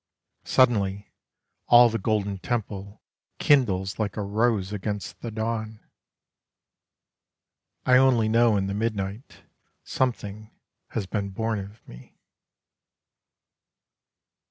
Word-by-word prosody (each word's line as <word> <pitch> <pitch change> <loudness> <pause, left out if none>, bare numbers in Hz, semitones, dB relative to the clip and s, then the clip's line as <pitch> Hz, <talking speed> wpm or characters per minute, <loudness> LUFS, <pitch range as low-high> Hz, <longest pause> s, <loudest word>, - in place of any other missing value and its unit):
Suddenly, 100 -6 +2 0.6
all 120 0 +8
the 115 0 -2
golden 100 -2 -1
temple 100 -3 -4 0.3
Kindles 100 -10 +2
like 105 -1 -2
a 105 - -1
rose 105 -1 0
against 105 0 -5
the 120 - -5
dawn. 110 0 -4 2.1
I 125 0 +6
only 130 -4 +4
know 115 -1 +3
in 95 - 0
the 100 - -3
midnight 105 +1 -4 0.4
Something 110 -4 -3 0.4
has 105 - -4
been 100 0 -3
born 110 +2 -2
of 100 +3 -11
me. - - -14
110 Hz, 100 wpm, -25 LUFS, 100-115 Hz, 2.1 s, all